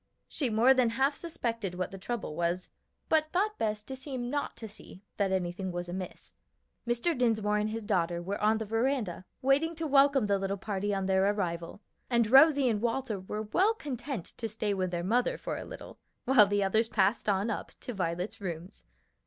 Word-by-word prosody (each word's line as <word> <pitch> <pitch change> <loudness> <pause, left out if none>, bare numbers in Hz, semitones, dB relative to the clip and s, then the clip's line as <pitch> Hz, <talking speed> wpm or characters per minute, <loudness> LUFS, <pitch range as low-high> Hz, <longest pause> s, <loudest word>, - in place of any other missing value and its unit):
She 270 -5 -2
more 230 +4 +5
than 255 -3 +3
half 265 +5 +1
suspected 230 - -3
what 180 -1 -3
the 195 - -8
trouble 215 -6 -4
was, 175 +2 -1 0.4
but 310 -1 +2
thought 425 +4 0
best 210 -1 -2
to 265 - -5
seem 255 -2 -5
not 290 0 -2
to 225 - -7
see 200 -2 -12
that 200 -2 +1
anything 185 0 -2
was 175 0 -4
amiss. 180 +1 -7 0.5
Mr. 240 +8 +1
Dinsmore 215 -4 +1
and 210 +1 0
his 225 +1 -4
daughter 175 -5 0
were 195 +4 -4
on 215 +1 +3
the 220 - -3
veranda 225 -4 -1 0.2
waiting 285 +5 +3
to 325 0 -4
welcome 275 -3 +4
the 200 -1 +1
little 195 +1 -2
party 200 +1 -2
on 195 -1 -1
their 190 +1 +3
arrival, 170 -2 -3 0.3
and 235 -3 +2
Rosie 280 0 +7
and 215 -3 +1
Walter 235 -3 -1
were 210 +3 -4
well 380 - +2
content 265 - -5
to 225 - -3
stay 215 -1 -1
with 185 -2 -1
their 175 -1 -3
mother 235 +7 +1
for - - -4
a - - -6
little, - - -10 0.3
while 245 -5 +7
the 205 0 +1
others 220 +4 +2
passed 205 +1 +2
on 200 +3 +1
up - - -4
to 245 - -5
Violet's 180 +1 -3
rooms. 175 -1 -6
215 Hz, 195 wpm, -30 LUFS, 190-255 Hz, 0.5 s, Rosie